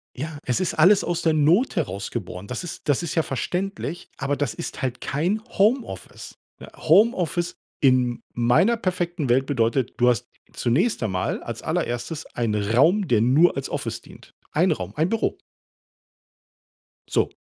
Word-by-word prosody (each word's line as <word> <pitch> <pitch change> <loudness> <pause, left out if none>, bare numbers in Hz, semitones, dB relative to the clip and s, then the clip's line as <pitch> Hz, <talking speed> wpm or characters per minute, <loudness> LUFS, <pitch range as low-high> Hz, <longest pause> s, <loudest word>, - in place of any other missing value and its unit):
Ja, 150 +3 -5
es 125 - 0
ist 185 - -1
alles 185 +6 +5
aus 175 0 -1
der 160 -1 +2
Not 165 - +3
heraus 100 - -3
geboren. 95 -4 -6
Das 125 - -5
ist 170 -3 -7
das 145 +5 +2
ist 170 - -4
ja 165 - +3
verständlich, 180 +6 -4
aber 145 +1 -1
das 140 -6 -2
ist - - -6
halt 125 -1 -3
kein 175 +10 -1 0.2
Homeoffice. 225 +6 -1 0.4
Homeoffice 175 - +2 0.2
in 125 -3 +2
meiner 125 - +3
perfekten 175 - -2
Welt 130 +2 +3
bedeutet: 120 -2 0
Du 125 0 +4
hast 120 -4 0 0.3
zunächst 150 - +1
einmal 95 -4 -2
als - - -6
allererstes 125 +7 -3
einen 105 -3 0
Raum, 175 - +4
der 115 -5 +3
nur 140 +9 +4
als 135 - -4
Office - - -4
dient, - - -16 0.2
ein - - +3
Raum, 95 +2 -3
ein 160 +4 +1
Büro. 225 -1 -1 1.7
So. - - +1
145 Hz, 155 wpm, -24 LUFS, 120-175 Hz, 1.7 s, alles